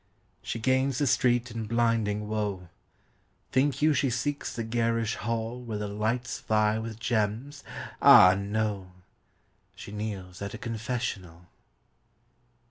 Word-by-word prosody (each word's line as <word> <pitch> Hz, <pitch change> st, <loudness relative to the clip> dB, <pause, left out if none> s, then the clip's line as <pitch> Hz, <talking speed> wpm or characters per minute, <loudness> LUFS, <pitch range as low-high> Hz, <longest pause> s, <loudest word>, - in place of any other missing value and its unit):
She -, -, -4 dB
gains 130 Hz, +3 st, +1 dB
the 145 Hz, -, +1 dB
street 125 Hz, -2 st, +2 dB
in 115 Hz, -1 st, -5 dB
blinding 115 Hz, -2 st, +1 dB
woe: 105 Hz, -4 st, -3 dB, 0.8 s
Think 140 Hz, +2 st, +1 dB
you 155 Hz, 0 st, +5 dB
she 140 Hz, -1 st, +1 dB
seeks 140 Hz, +5 st, -2 dB
the 115 Hz, -, -4 dB
garish 115 Hz, 0 st, 0 dB
hall 115 Hz, +2 st, -3 dB
Where 115 Hz, -3 st, -5 dB
the 105 Hz, 0 st, -3 dB
lights 110 Hz, +4 st, -2 dB
vie 110 Hz, 0 st, +1 dB
with 110 Hz, -1 st, -6 dB
gems? 115 Hz, +5 st, -1 dB, 0.4 s
ah 90 Hz, 0 st, +9 dB
no! 100 Hz, -2 st, -2 dB, 0.8 s
She -, -, -10 dB
kneels 100 Hz, -4 st, -6 dB
at 100 Hz, +1 st, -5 dB
a -, -, -6 dB
confessional. 110 Hz, -7 st, -4 dB
110 Hz, 130 wpm, -28 LUFS, 105-120 Hz, 0.8 s, ah